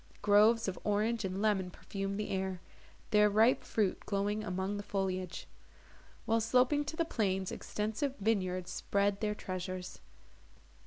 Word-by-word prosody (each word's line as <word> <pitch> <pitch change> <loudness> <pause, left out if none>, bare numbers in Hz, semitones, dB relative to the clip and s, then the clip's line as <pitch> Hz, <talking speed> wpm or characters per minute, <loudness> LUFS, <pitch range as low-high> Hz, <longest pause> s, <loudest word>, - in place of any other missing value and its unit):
Groves 215 +2 +5
of 190 - -3
orange 215 +2 +1
and 190 +2 -3
lemon 195 -4 +2
perfumed 195 +2 -5
the 210 - -3
air, 190 -1 -2 0.5
their 210 0 +5
ripe 220 +5 +4
fruit 205 -4 0
glowing 205 +1 0
among 190 0 -2
the - - -3
foliage; 190 -3 -3 0.8
while, 225 0 +2
sloping 255 +6 +3
to 295 - -5
the 335 - 0
plains, 195 - -1
extensive 220 +7 -3
vineyards 185 -4 0
spread 200 +1 0
their 210 -1 0
treasures. 185 -1 -5
205 Hz, 140 wpm, -33 LUFS, 190-220 Hz, 0.8 s, Groves